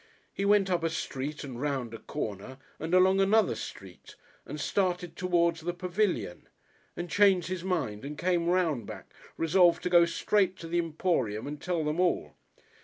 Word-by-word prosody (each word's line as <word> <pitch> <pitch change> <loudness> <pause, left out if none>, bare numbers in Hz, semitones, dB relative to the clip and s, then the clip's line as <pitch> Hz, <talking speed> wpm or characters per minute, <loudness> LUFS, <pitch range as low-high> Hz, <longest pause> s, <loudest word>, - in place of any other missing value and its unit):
He 195 - -2
went 200 -2 +3
up 175 -2 0
a 165 - +1
street 150 -2 -4
and 130 -3 -7
round 135 -5 -2
a 115 - -7
corner 105 +5 -6 0.2
and 165 +3 -1
along 190 +1 +5
another 205 +1 +3
street, 95 -2 -10 0.3
and 150 +2 -6
started 180 +1 -1
towards 170 -2 +1
the 175 +2 -3
Pavilion 175 - -2 0.5
and 175 - -4
changed 195 -2 +3
his 185 -2 -4
mind 140 - -2
and 145 +2 -6
came 175 -1 0
round 165 - +1
back, - - -10 0.2
resolved 170 +1 +3
to 180 - -2
go 170 -1 +7
straight 190 +2 +1
to 165 - -8
the 175 +1 0
Emporium 155 - -1
and 145 0 -6
tell 175 -3 -1
them 150 +3 -2
all. 170 - +1
170 Hz, 175 wpm, -29 LUFS, 145-185 Hz, 0.5 s, go